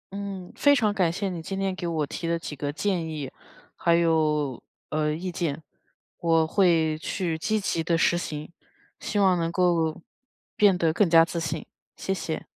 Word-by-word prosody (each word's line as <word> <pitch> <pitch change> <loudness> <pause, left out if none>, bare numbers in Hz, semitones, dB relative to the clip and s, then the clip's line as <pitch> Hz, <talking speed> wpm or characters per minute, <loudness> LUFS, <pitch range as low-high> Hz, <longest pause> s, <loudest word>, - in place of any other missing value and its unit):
嗯， 195 -3 -6
非 285 0 +5
常 215 -5 +2
感 180 -5 +2
谢 200 +3 -2
你 175 -3 -5
今 195 +4 -5
天 195 -1 -1
给 175 -2 -4
我 160 -3 0
提 165 +4 -5
的 170 0 +1
几 160 -2 -7
个 145 +1 -3
建 170 0 -1
议， 150 -4 -5 0.4
还 170 0 +2
有， 155 -5 +1 0.3
呃， 150 0 0
意 180 +4 -3
见。 160 -3 -3 0.6
我 165 -1 +3
会 165 -4 +3
去 170 -1 -2
积 215 +5 0
极 165 -4 -1
地 165 0 +1
实 170 - +3
行， 155 -2 -5 0.5
希 210 - -3
望 190 -2 +4
能 165 0 -1
够 170 -3 +1 0.6
变 200 -3 +5
得 165 -3 +2
更 185 0 +3
加 165 0 +7
自 170 0 -4
信， 160 -1 -3 0.3
谢 190 - -2
谢。 165 -4 -4
170 Hz, 195 characters per minute, -26 LUFS, 160-185 Hz, 0.6 s, 加